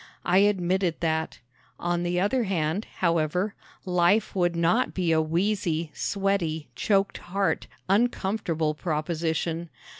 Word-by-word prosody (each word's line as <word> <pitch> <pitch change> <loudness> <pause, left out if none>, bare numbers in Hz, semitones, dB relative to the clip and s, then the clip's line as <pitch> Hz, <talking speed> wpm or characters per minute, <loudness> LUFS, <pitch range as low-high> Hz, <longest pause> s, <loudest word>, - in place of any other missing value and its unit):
I 180 +2 +4
admitted 190 -3 +2
that. 160 -1 -1 0.4
On 175 0 0
the 175 0 0
other 225 +6 +1
hand, 180 +1 -1 0.2
however, 170 +3 +1 0.3
life 180 +4 +2
would 175 -2 +1
not 170 +9 +2
be 180 -3 +1
a 160 -1 +4
wheezy, 170 -1 0
sweaty, 195 -6 -1
choked 200 -1 +1
heart, 195 +2 -1 0.2
uncomfortable 190 -6 +1
proposition. 160 +1 -2
175 Hz, 115 wpm, -26 LUFS, 165-195 Hz, 0.4 s, I